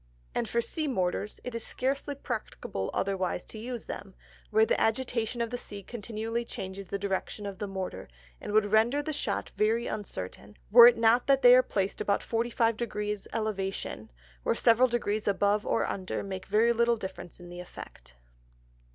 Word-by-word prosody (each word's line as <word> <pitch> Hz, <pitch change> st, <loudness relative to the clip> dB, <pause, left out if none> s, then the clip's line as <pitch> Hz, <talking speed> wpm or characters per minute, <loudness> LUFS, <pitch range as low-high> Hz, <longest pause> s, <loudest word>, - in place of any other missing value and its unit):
And -, -, -1 dB
for 235 Hz, 0 st, +1 dB
Sea 310 Hz, +4 st, -3 dB
Mortars, 200 Hz, -3 st, -1 dB
it 250 Hz, -, -5 dB
is 230 Hz, -1 st, -3 dB
scarce 270 Hz, +2 st, -1 dB, 0.2 s
practicable 215 Hz, -, -4 dB
otherwise 190 Hz, -2 st, -1 dB
to 220 Hz, -, -9 dB
use 240 Hz, +1 st, -5 dB
them, 195 Hz, -1 st, -7 dB, 0.3 s
where 220 Hz, 0 st, +5 dB
the -, -, +1 dB
agitation 235 Hz, 0 st, 0 dB
of 230 Hz, 0 st, -1 dB
the 245 Hz, -, -3 dB
Sea 200 Hz, -3 st, -6 dB
continually 225 Hz, +2 st, -4 dB
changes 195 Hz, -3 st, -7 dB
the 200 Hz, -, -2 dB
Direction 200 Hz, +1 st, -3 dB
of 195 Hz, -2 st, -6 dB
the 205 Hz, -, -3 dB
Mortar, 190 Hz, -, -5 dB, 0.3 s
and -, -, -5 dB
would 205 Hz, -1 st, +3 dB
render 235 Hz, +7 st, +3 dB
the 310 Hz, -, -3 dB
Shot 295 Hz, -, -2 dB
very 225 Hz, +3 st, +2 dB
uncertain, 105 Hz, -, -6 dB
were 235 Hz, +2 st, +11 dB
it 240 Hz, -, +5 dB
not 230 Hz, +2 st, +4 dB
that 275 Hz, -1 st, +4 dB
they 245 Hz, 0 st, +10 dB
are 255 Hz, -, +8 dB
placed 200 Hz, -5 st, -2 dB
about 200 Hz, -, +1 dB
45 230 Hz, -1 st, +1 dB
Degrees 210 Hz, -3 st, -3 dB
Elevation, 200 Hz, -3 st, -3 dB, 0.3 s
where -, -, +1 dB
several 235 Hz, +2 st, +5 dB
Degrees 220 Hz, -3 st, -1 dB
above 205 Hz, +1 st, +2 dB
or -, -, +1 dB
under, 190 Hz, -1 st, -3 dB
make 190 Hz, -1 st, -6 dB
very 220 Hz, +4 st, +4 dB
little 235 Hz, 0 st, +3 dB
difference 190 Hz, -4 st, -7 dB
in 175 Hz, 0 st, -11 dB
the 175 Hz, 0 st, -8 dB
Effect. 65 Hz, -, -11 dB
215 Hz, 175 wpm, -29 LUFS, 195-235 Hz, 0.3 s, were